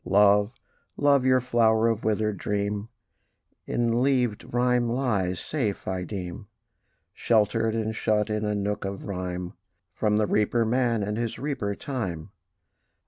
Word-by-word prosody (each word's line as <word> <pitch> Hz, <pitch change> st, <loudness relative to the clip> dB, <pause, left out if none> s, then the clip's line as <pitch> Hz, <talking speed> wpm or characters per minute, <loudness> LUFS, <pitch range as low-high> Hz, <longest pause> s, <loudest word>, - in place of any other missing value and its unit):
Love, 100 Hz, +1 st, +4 dB, 0.5 s
love! 140 Hz, -2 st, +4 dB
your 130 Hz, 0 st, +5 dB
flower 115 Hz, -2 st, +3 dB
of 115 Hz, -1 st, 0 dB
withered 105 Hz, -1 st, 0 dB
dream 100 Hz, +2 st, -2 dB, 0.8 s
In 120 Hz, -1 st, 0 dB
leavèd 125 Hz, -2 st, +1 dB
rhyme 125 Hz, 0 st, +2 dB
lies 105 Hz, -8 st, 0 dB
safe, 120 Hz, -10 st, -3 dB
I 95 Hz, -1 st, -2 dB
deem, 90 Hz, -3 st, -6 dB, 0.7 s
Sheltered 110 Hz, 0 st, +1 dB
and 110 Hz, -1 st, -2 dB
shut 105 Hz, -1 st, +1 dB
in 105 Hz, 0 st, -2 dB
a 105 Hz, 0 st, 0 dB
nook 105 Hz, +1 st, -2 dB
of 100 Hz, 0 st, -5 dB
rhyme, 90 Hz, -2 st, -4 dB, 0.4 s
From 105 Hz, 0 st, +1 dB
the 105 Hz, -, +2 dB
reaper 110 Hz, +3 st, +1 dB
man, 120 Hz, -2 st, +1 dB
and 105 Hz, +2 st, -2 dB
his 115 Hz, -1 st, -2 dB
reaper 130 Hz, -8 st, -2 dB
Time. 95 Hz, -, -5 dB
110 Hz, 140 wpm, -26 LUFS, 100-120 Hz, 0.8 s, your